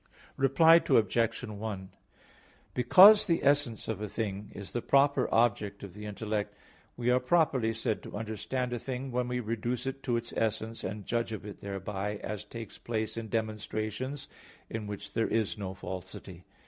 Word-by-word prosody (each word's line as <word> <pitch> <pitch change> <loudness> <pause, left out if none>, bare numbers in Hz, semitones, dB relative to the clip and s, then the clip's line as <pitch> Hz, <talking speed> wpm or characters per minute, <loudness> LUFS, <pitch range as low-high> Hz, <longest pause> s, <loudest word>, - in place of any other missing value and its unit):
Reply 150 +5 +6
Obj. 115 +2 +2
1: 105 -4 -5 0.8
Because 190 - +8
the 165 -2 +1
essence 140 -5 +2
of 110 -3 -3
a 105 - -3
thing 105 -1 -3
is 100 -1 -7
the 120 - -2
proper 140 0 +3
object 105 -3 +1
of 100 -3 -8
the 105 +1 -8
intellect, 105 0 -3 0.4
we 120 0 +1
are 125 - +4
properly 130 -5 +2
said 115 -1 -2
to - - -7
understand 115 +4 -3
a 120 - -2
thing 130 +1 -5
when 125 0 0
we 125 0 -1
reduce 115 +2 -2
it 135 +1 -4
to 120 -3 0
its 115 0 -6
essence, 110 +1 -1
and 100 +1 -5
judge 115 -1 -1
of 110 -2 -6
it 105 - -8
thereby; 100 +1 -4
as 105 -2 -4
takes 115 -3 -9
place 110 -2 -2
in 115 -1 -5
demonstrations, 110 +4 -3 0.4
in 110 -2 -4
which 105 -1 -7
there 115 - +1
is 110 -2 0
no 95 -2 -5
falsity. 95 -1 -8
110 Hz, 170 wpm, -30 LUFS, 105-125 Hz, 0.8 s, Because